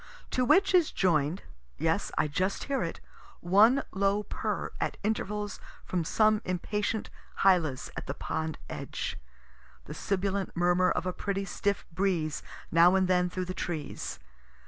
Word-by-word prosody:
To 255 - +1
which 380 +10 +4
is 350 -4 +4
join'd, 165 -1 +1 0.3
(yes, - - 0
I - - +3
just 185 +7 -1
hear 275 -3 -1
it,) 165 - -3 0.4
one 215 +10 +5
low 200 +2 +1
purr - - -3
at - - -1
intervals 210 -1 -2 0.3
from 180 -2 -1
some 215 +5 +3
impatient 210 +4 -2 0.3
hylas 170 -9 +3
at - - -6
the - - -3
pond 160 0 -3
edge. - - -5 0.7
The - - -7
sibilant 195 -1 -2
murmur 175 +1 +3
of - - -1
a 185 - -1
pretty 195 0 -2
stiff 200 +1 -1
breeze 170 -4 0 0.3
now 170 +3 +6
and 190 -1 +3
then 180 -1 +3
through 185 +1 -3
the 185 - -4
trees. 160 -5 -4
190 Hz, 145 wpm, -29 LUFS, 175-205 Hz, 0.7 s, now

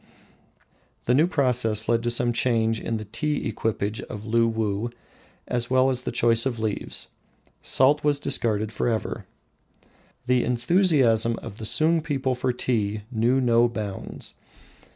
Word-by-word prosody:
The 125 - +2
new 150 +6 +4
process 125 - +1
led 115 -1 +2
to 120 - -1
some 120 0 0
change 115 -1 +1
in 115 - -3
the 110 - -7
tea 150 +8 -2
equipage 110 -1 -2
of 105 - -8
Luwuh, 115 -1 0 0.6
as 120 -1 -2
well 130 +1 +3
as 125 - -1
in 125 - -13
the - - -2
choice 115 +1 +2
of 120 -3 -3
leaves. 110 -2 -3 0.5
Salt 140 +3 +3
was 145 -1 +2
discarded 110 -7 0
forever. 110 0 -2 1.0
The 125 0 +2
enthusiasm 125 - +3
of 100 - -8
the 110 - -6
Sung 160 +8 +2
people 135 -4 -1
for 125 +1 -1
tea 110 -4 -1
knew 120 +3 +2
no 120 -1 +3
bounds. 105 -4 -6
120 Hz, 145 wpm, -24 LUFS, 110-130 Hz, 1.0 s, new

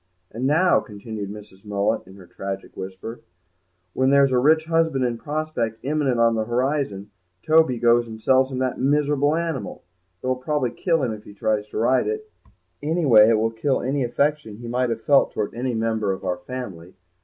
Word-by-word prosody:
"And 125 +4 -2
now," 170 +5 +4
continued 105 -1 -7
Mrs. 100 -2 -11
Mullet, 100 -2 -1
in 95 - -13
her 95 -2 -14
tragic 95 +2 -7
whisper, 95 +5 -7 0.7
"when 130 0 +2
there's 140 -1 +5
a 125 - +3
rich 155 +4 +4
husband 160 -5 +1
in 120 -1 -2
prospect 150 -7 -3
imminent 140 -3 0
on 115 0 +4
the 110 -1 -1
horizon 120 -5 -1 0.3
Toby 160 -5 +4
goes 120 0 +3
and 110 -1 -9
sells 130 +3 +3
him 130 - -4
that 130 -1 -1
miserable 145 +2 +2
animal. 165 -5 -4 0.4
It - - -6
will 130 0 0
probably 130 -1 -1
kill 165 -1 0
him 120 -3 -1
if 105 0 -10
he 100 - -13
tries 105 0 -1
to - - -6
ride 120 +4 +2
it; 435 0 -3 0.5
anyway 145 -9 +5
it 115 - +4
will 115 +1 +1
kill 130 +5 -1
any 135 +2 0
affection 140 -2 -1
he 120 +1 -9
might 125 +1 0
have 115 -1 -3
felt 140 -1 +4
towards 105 - -3
any 125 +1 -2
member 110 -2 0
of 95 - -5
our 90 - -1
family. 95 -10 -8
125 Hz, 190 wpm, -23 LUFS, 110-145 Hz, 0.7 s, there's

